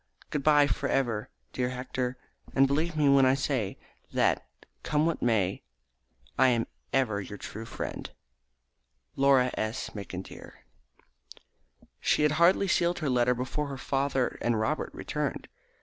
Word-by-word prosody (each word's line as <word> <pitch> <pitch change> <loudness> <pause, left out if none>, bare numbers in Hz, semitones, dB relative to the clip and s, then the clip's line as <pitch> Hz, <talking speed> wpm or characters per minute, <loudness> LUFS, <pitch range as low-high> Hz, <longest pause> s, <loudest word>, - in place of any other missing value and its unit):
Good 150 - -1
bye, 145 0 +5
for 145 - -1
ever, 115 -6 0 0.2
dear 125 -1 -1
Hector, 125 0 -3 0.4
and 135 - +6
believe 155 +4 0
me 150 -2 +3
when 140 -1 +6
I 130 - +4
say 135 -7 -1 0.3
that, - - +2 0.4
come 150 +1 +1
what 165 -1 -1
may, 105 -6 +1 0.8
I 130 - +7
am 120 -2 +2 0.3
ever 110 -7 +1
your 100 +1 -8
true 110 +3 -7
friend, - - -5 1.1
"Laura 135 -2 +4
S. 110 +3 -3
McIntyre." 95 -2 -8 1.5
She 150 - +2
had 150 - +4
hardly 185 +3 +5
sealed 175 -1 +2
her 150 -5 -1
letter 125 0 +3
before 130 +4 -3
her 135 -1 -6
father 135 0 -1
and 120 -2 +1
Robert 110 - -1
returned. - - -4
130 Hz, 140 wpm, -28 LUFS, 120-145 Hz, 1.5 s, I